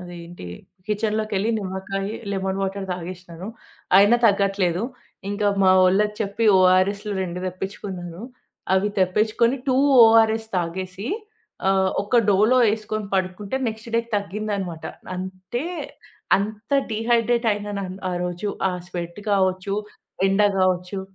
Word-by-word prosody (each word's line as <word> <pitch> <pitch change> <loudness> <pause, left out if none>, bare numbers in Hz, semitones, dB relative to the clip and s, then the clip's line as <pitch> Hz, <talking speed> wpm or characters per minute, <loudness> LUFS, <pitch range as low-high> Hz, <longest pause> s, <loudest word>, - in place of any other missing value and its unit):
అదెంటి. 175 - -9 0.4
కిచెన్‌లోకి 215 0 -1
వెళ్లి 210 +4 +1
నిమ్మకాయ 195 +1 -4 0.2
లెమన్ 190 0 -2
వాటర్ 195 0 -3
తాగేశ్నాను. 180 0 -8 0.5
అయినా 205 +4 +6
తగ్గట్లేదు. 195 -2 +1 0.5
ఇంకా 205 0 -1 0.2
మా 185 - +6
వోళ్ళకి 210 +3 +3
చెప్పి 200 +2 -1
ఓఆర్ఎస్‌లు 190 +3 +3
2 175 -1 -4
తెప్పిచ్చుకున్నాను. 185 -1 -6 0.5
అవి 190 +2 +2
తెప్పిచ్చుకొని 215 +7 +2
2 255 - +3 0.3
ఓఆర్ఎస్ 225 0 +4
తాగేసి. 185 +5 -3 0.6
ఆహ్, 190 -1 +3
ఒక 210 +4 0
డోలో 215 +6 +4
వేసుకొని 215 -1 -2
పడుకుంటే 190 +5 -2
నెక్స్ట్ 220 +1 -7
డేకి 230 0 0
తగ్గిందన్నమాట. 200 -4 -4 0.3
అంటే 185 - -5 0.7
అంత 215 +4 -5 0.2
డీహైడ్రేట్ 235 +1 +1
అయినాను. 200 -2 -5
ఆరోజు 180 +3 -3 0.2
ఆ - - -4 0.2
స్వెట్ 175 +2 -6
కావచ్చు. 190 0 +1 0.5
ఎండ 195 +2 +3 0.2
గావచ్చు. 185 +1 0
195 Hz, 110 wpm, -23 LUFS, 185-215 Hz, 0.7 s, అయినా